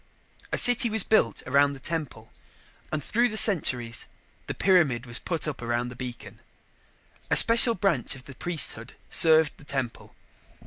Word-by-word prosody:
A - - -2
city 245 -1 +5
was 220 -2 +2
built 220 - 0
around 140 +2 +1
the 135 - -12
temple 140 -7 -6 0.6
and, 155 -2 -4
through 240 - -1
the 220 - -3
centuries, 125 - +1 0.4
the - - -6
pyramid 155 -11 0
was 120 -1 -1
put 165 -2 -3
up 145 -4 -7
around 120 +1 -4
the 125 - -12
beacon. 125 -1 -10 0.9
A - - +3
special 230 0 +6
branch 170 - -2
of 130 - -15
the 140 - -12
priesthood 135 -6 0 0.2
served 160 -2 +4
the - - -18
temple. 135 -4 -7
145 Hz, 155 wpm, -24 LUFS, 125-185 Hz, 0.9 s, special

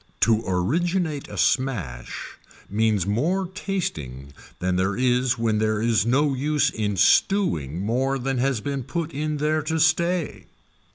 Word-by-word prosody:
To 115 -1 +4
originate 155 - 0
a - - -9
smash 90 - -1 0.3
means 105 -2 +1
more 160 - 0
tasting 80 - -5 0.2
than 90 0 -1
there 95 +2 0
is 125 0 +1
when 110 -2 0
there 110 -1 +1
is 115 -1 +2
no 140 +4 +2
use 145 +3 +1
in 105 -3 -2
stewing 90 - +2
more 130 +7 0
than 135 0 -2
has 130 -3 0
been 140 +1 -3
put 165 +5 -4
in 150 +2 -2
there 155 +1 +1
to 160 +2 -2
stay. 170 +1 +1
130 Hz, 145 wpm, -24 LUFS, 105-155 Hz, 0.3 s, To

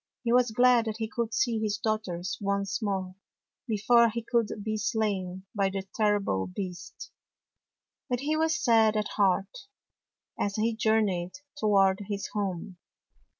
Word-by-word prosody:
He 235 -1 +1
was 250 -1 +4
glad 245 +1 +4
that 220 -1 -3
he 220 -1 -2
could 235 0 -3
see 230 0 +1
his 210 -1 -1
daughters 205 -5 -2
once 200 +2 -1
more, 190 -3 -2 0.5
before 235 +2 +4
he 230 +1 -5
should 225 -3 0
be 215 0 -2
slain 195 -4 -2
by 195 -2 +1
the 195 0 -5
terrible 205 - +1
beast. 180 - -7 1.0
But 245 0 -1
he 300 +2 0
was 320 +1 +1
sad 225 -8 +3
at 210 - -1
heart 195 - +1 0.8
as 200 0 -1
he 225 +1 0
jour 220 0 +3
neyed 185 -2 -2 0.2
toward 195 -6 +3
his 200 -1 -3
home. 190 -3 -3
210 Hz, 150 wpm, -28 LUFS, 195-230 Hz, 1.0 s, was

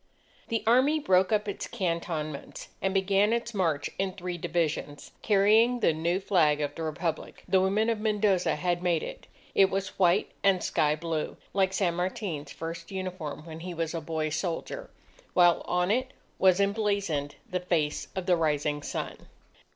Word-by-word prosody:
The 230 -2 -1
Army 260 +7 +4
broke 190 -10 +3
up 210 -1 +1
its 200 - -4
cantonments, 165 -5 -3
and 195 - +1
began 195 +2 +3
its 235 0 -1
march 165 -8 0
in 190 -1 0
three 180 -2 -5
divisions, 160 -3 -2
carrying 220 +4 +4
the 165 - +4
new 170 +4 0
flag 165 -7 +3
of 145 -1 -2
the 165 - -7
Republic. 160 +1 -3
The 190 -1 +4
women 200 +4 +2
of 230 -2 0
Mendoza 210 -4 +2
had 175 +2 -1
made 175 -3 +1
it. - - -8 0.3
It 195 -1 +5
was 195 0 -3
white 180 +1 +3
and 195 -2 +3
sky 150 0 +2
blue, 160 -1 -3 0.2
like 190 -1 +2
San 190 -3 +1
Martin's 180 -3 -3
first 165 +1 -6
uniform 185 -5 -5
when 160 -1 -8
he 175 +1 -6
was 165 0 -2
a 165 - -3
boy 155 0 -2
soldier, 175 - -3 0.5
while 175 -1 +5
on 180 +2 +1
it 255 +3 0 0.3
was 185 0 +5
emblazoned 200 -8 0
the 185 -4 -2
face 165 -5 -1
of 190 -1 -3
the 180 -1 +4
Rising 150 -2 0
Sun. - - -5
180 Hz, 165 wpm, -28 LUFS, 165-200 Hz, 0.5 s, It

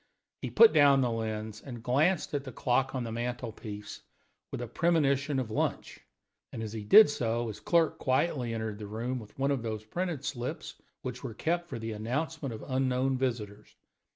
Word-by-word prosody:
He - - -3
put 460 -1 +7
down 140 -1 +6
the 125 -2 +1
lens 110 -1 -4
and 120 -4 -9
glanced 155 +10 +2
at 145 -1 -1
the 130 - -7
clock 130 +3 0
on 130 - -1
the 115 - -5
mantel 120 0 -3
piece 105 -2 -8 0.5
with - - -4
a 120 - -4
premonition 145 -2 +1
of 125 -4 -2
lunch; - - -2 0.5
and 115 - -5
as 110 -1 -5
he 110 -2 -5
did 215 - +9
so 120 -4 -1
his 105 - -7
clerk 170 -2 +2
quietly 130 -2 +1
entered 110 -2 -3
the 105 - -6
room 120 +5 -3
with 105 -3 -13
one 140 +1 +1
of 135 -4 0
those 110 -2 -4
printed 165 +2 -3
slips 125 -3 -5 0.2
which 125 +1 -5
were 120 -5 -5
kept 175 +4 -1
for - - -4
the 115 0 -4
announcement 135 +7 -3
of 110 - -7
unknown 130 0 +1
visitors. 110 -5 -3
125 Hz, 190 wpm, -30 LUFS, 110-140 Hz, 0.5 s, did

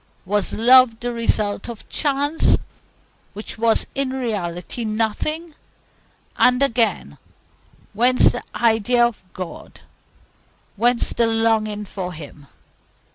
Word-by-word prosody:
Was 205 +2 -1
love 245 0 +5
the 245 0 -4
result 215 -2 -1
of 230 -2 -9
chance, 290 +2 +1 0.8
which 215 +2 -9
was 225 0 +2
in 275 -1 -1
reality 210 -5 -4
nothing? 230 +10 -2 0.8
And 250 +2 +4
again, 225 - 0 0.7
whence 245 +4 +4
the - - -5
idea 235 +1 +3
of 235 -5 -4
God, 185 -2 -9 0.9
whence 240 +3 +1
the 235 - +2
longing 220 -2 0
for 185 -2 -6
Him? 145 -2 -11
225 Hz, 105 wpm, -21 LUFS, 210-250 Hz, 0.9 s, love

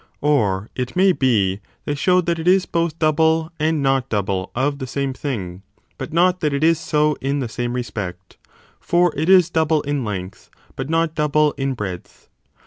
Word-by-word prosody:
Or, 105 -9 +1
it 125 -1 -4
may 190 +1 +5
be, 105 - +1 0.3
they 145 - -1
show 180 +5 +2
that 170 -1 -1
it 165 - -4
is 185 +1 +4
both 170 -1 -1
double 160 +1 +2
and 155 -1 +1
not 135 -1 +1
double 100 -3 -1
of 140 +3 0
the 130 - -5
same 135 +1 -2
thing, 100 -11 -5 0.4
but - - -6
not 180 +3 +3
that 150 -4 0
it 140 +2 -1
is 165 0 +4
so 150 -2 +1
in 140 +2 -1
the 130 -4 -2
same 120 +1 -3
respect: 95 -7 -6 0.4
for 175 0 +2
it 155 +4 -1
is 185 -3 +6
double 160 -2 +1
in 145 -2 -2
length 95 -4 -6 0.3
but 135 - -5
not 165 0 +1
double 150 -1 +2
in 135 -1 -3
breadth. 95 -6 -7
145 Hz, 185 wpm, -20 LUFS, 120-160 Hz, 0.4 s, is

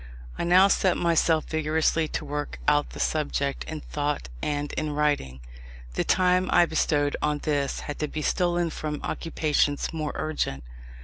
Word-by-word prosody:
I - - -3
now 185 +3 +6
set 190 -2 +2
myself 165 -2 +2
vigorously 160 +1 +1
to - - -4
work 145 0 -4
out 145 0 +3
the - - -10
subject 140 -2 -1
in 155 -1 -6
thought 145 - -3
and 145 -1 -2
in 155 -1 -2
writing. 145 - 0 0.5
The - - 0
time 185 0 +2
I 175 - +6
bestowed 150 -3 +1
on 150 0 +1
this 145 -2 -1
had 145 - -6
to 150 - -1
be 155 +1 -4
stolen 175 -1 +1
from 150 -1 -4
occupations 150 -3 0
more 155 -2 -3
urgent. 150 - -2
150 Hz, 160 wpm, -26 LUFS, 145-165 Hz, 0.5 s, now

